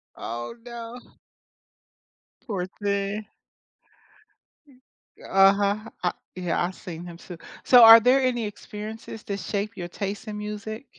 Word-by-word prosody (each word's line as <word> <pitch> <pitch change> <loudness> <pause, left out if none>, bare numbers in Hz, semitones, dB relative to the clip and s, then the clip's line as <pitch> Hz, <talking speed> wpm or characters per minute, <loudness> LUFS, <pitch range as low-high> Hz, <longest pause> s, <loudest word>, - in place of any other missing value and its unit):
Oh, 120 - -6
no. 235 0 -8 1.5
Poor 190 -6 -2
thing. 200 +2 -3 1.9
Uh-huh. 200 +3 +3
I 180 - +2 0.2
yeah, 180 -2 -1
I've 180 +1 -3
seen 170 -1 -8
him 170 -1 -9
too. 175 -1 -10 0.3
So, 245 -2 +8
are 225 0 +11
there 255 +4 +4
any 245 -3 0
experiences 210 +2 -8
to 200 - -3
shape 205 +2 -4
your 175 -1 -6
taste 200 +4 -5
in 210 - -5
music? 210 +4 -6
205 Hz, 120 wpm, -25 LUFS, 190-225 Hz, 1.9 s, are